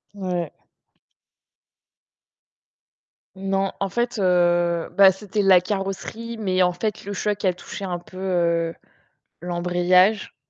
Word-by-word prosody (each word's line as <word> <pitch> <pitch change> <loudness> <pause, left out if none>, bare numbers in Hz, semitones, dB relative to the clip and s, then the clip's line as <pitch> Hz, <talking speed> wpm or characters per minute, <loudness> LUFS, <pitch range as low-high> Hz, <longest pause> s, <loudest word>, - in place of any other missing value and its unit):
Ouais. 180 -5 -3 2.8
Non, 195 0 -1
en 195 - -1
fait, 240 +3 -2
heu, 175 -2 +2
bah, 195 -1 +8
c'était 205 +2 -3
la 190 -2 +6
carrosserie 205 +5 -5
mais 185 -4 0
en 180 -1 +4
fait, 210 +4 -4
le 200 +1 -5
choc 205 +1 -2
a 185 - +3
touché 190 +3 -9
un 180 -2 -3
peu, 175 +2 -14
heu, 170 -3 0 0.6
l'embrayage. 180 +3 +2
185 Hz, 115 wpm, -23 LUFS, 175-200 Hz, 2.8 s, bah